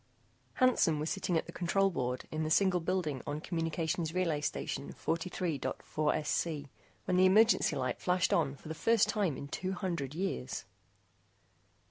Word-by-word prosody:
] - - -38
Hansen 250 - +3
was 155 +2 -2
sitting 185 -3 0
at - - -1
the - - -9
control 195 +3 +1
board 125 -5 -2
in 155 - -2
the 155 - -1
single 185 +2 +3
building 165 -6 -1
on 145 +1 -2
Communications 165 0 -2
Relay 165 -5 +1
Station 145 - -3
43.4SC, 155 -2 -2 0.4
when 180 - +1
the 185 +1 +6
emergency 215 -4 +5
light 130 -2 -2
flashed 180 0 +2
on 145 -4 +2
for 140 - -13
the 160 - -3
first 225 +6 +3
time 195 -10 0
in 140 - -6
two 185 +6 -3
hundred 170 -7 -3
years. 165 - -3
165 Hz, 155 wpm, -32 LUFS, 150-185 Hz, 0.4 s, the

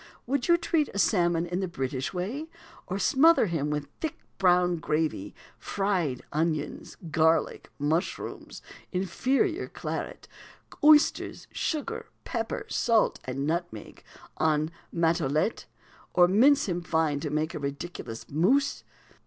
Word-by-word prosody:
Would 265 +1 -1
you 345 0 +6
treat 330 -3 0
a - - -2
salmon 175 -4 +2
in 175 +1 -3
the 190 - -1
British 135 -5 -3
way, 225 - -4 0.4
or 190 - -2
smother 280 - +5
him 160 -6 -1
with 150 -1 -2
thick 320 -3 -3 0.2
brown 180 -2 +4
gravy, 155 -10 -2 0.2
fried 185 -10 -1
onions, 155 0 -2
garlic, 160 +1 +2
mushrooms, 155 +4 -3 0.3
inferior 265 - 0
claret, - - -5 0.6
oysters, 300 0 +4
sugar, 305 -3 -3 0.2
pepper, 230 -3 -3
salt, 230 -2 +2
and 135 +2 -3
nutmeg, 165 -8 -4 0.4
en 155 0 +2 0.2
Matelote, 165 +2 +1 0.5
or 175 -1 +7
mince 250 +10 +4
him 175 -2 -1
fine 160 -4 0
to 150 - -3
make 155 +2 -1
a - - -4
ridiculous 140 -4 -6
mousse? 250 - +2
175 Hz, 120 wpm, -28 LUFS, 155-225 Hz, 0.6 s, or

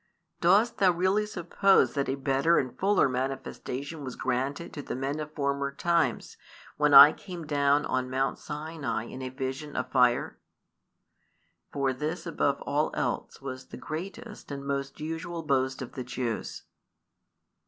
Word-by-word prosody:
Dost 200 +7 +3
thou 190 - +5
really 190 +4 +1
suppose 195 +1 +3
that 140 -1 -1
a 135 - 0
better 140 +4 +2
and 130 -2 -1
fuller 200 -3 +3
manifestation 135 +3 -4
was 130 -2 -6
granted 130 +5 -2
to 145 - -5
the - - -5
men 135 +3 -2
of 150 0 -5
former 140 -1 -1
times, 170 +4 0 0.4
when - - +2
I - - +11
came 175 -4 -8
down 145 -1 +2
on 130 0 -1
Mount 135 +1 -1
Sinai 150 -7 -4
in 130 +2 -8
a 130 - -4
vision 135 +3 -5
of 130 0 -3
fire?" 125 -2 +2 1.3
For 135 -2 0
this 155 +6 -4
above 145 -4 0
|259 - - -6
all 145 +2 0
else - - -3
was 130 -1 -6
the - - -9
greatest 195 +7 -7
and 140 -1 -6
most 140 -1 -3
usual 165 +2 -4
boast 130 -3 0
of 125 - -9
the 130 - -5
Jews. 125 -2 -4
140 Hz, 155 wpm, -28 LUFS, 130-165 Hz, 1.3 s, I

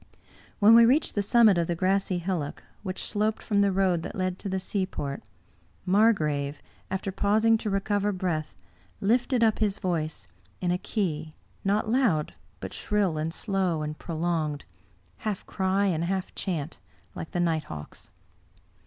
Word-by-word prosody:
When 210 +2 +7
we 230 0 +9
reached 265 +7 +3
the 205 - +1
summit 210 -2 +5
of 170 - 0
the 175 - -1
grassy 190 +1 +1
hillock, 175 -5 -3 0.2
which 185 -2 -5
sloped 215 +1 -1
from 205 -3 +2
the 200 -1 +3
road 185 -3 +2
that - - -6
led 185 -1 -2
to 200 - -4
the 190 0 -1
seaport, 185 -8 -3 0.6
Margrave, 155 -9 +2 0.3
after 190 +1 -2
pausing 215 +4 +3
to 215 - -3
recover 205 +1 0
breath, 175 -5 -2 0.4
lifted 240 +3 +2
up 220 -2 +3
his 210 -2 +1
voice, 165 -5 -2 0.3
in 180 -1 0
a 180 - 0
key, 160 -8 -2 0.3
not 205 +2 +1
loud, 220 - +2 0.3
but - - -6
shrill 200 -7 0
and 160 +1 -1
slow 185 -4 -1
and 150 0 -4
prolonged, 160 -3 -2 0.5
half 210 -3 -4
cry 190 +1 +1
and 170 -4 +1
half 190 +1 -2
chant, 170 -5 -3 0.3
like 160 - -6
the 175 - -3
nighthawk's. 155 - -3
190 Hz, 155 wpm, -27 LUFS, 165-205 Hz, 0.6 s, we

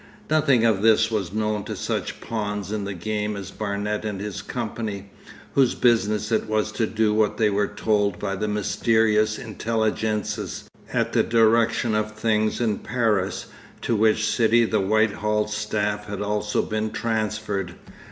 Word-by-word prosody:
Nothing 140 -7 +4
of 110 -4 +3
this 110 0 +4
was 100 -5 -1
known 105 0 -1
to - - -4
such - - -3
pawns 105 -3 -3
in 105 -2 -2
the 100 - -4
game 105 +3 -2
as 100 -2 -7
Barnet 105 0 -3
and 105 -3 -3
his 105 -1 -5
company, 105 -4 -5 0.4
whose 135 -3 +3
business 110 -3 +2
it - - +1
was 110 0 0
to 115 - 0
do 110 -1 +1
what 105 -1 +1
they 105 -2 +3
were 100 0 +1
told 105 -3 0
by 100 - -3
the 105 +2 -2
mysterious 110 0 +2
intelligences 110 -1 -2 0.2
at - - 0
the - - +4
direction 115 0 +3
of 110 0 -1
things 110 0 +1
in 110 -4 0
Paris, 105 -6 0 0.4
to 115 - +1
which 110 0 +3
city 115 +2 +3
the 110 -1 +1
Whitehall 105 +1 +1
staff 105 -1 -2
had 105 -1 -4
also 105 0 0
been 110 0 -2
transferred. 110 -5 -2
110 Hz, 155 wpm, -24 LUFS, 105-110 Hz, 0.4 s, Nothing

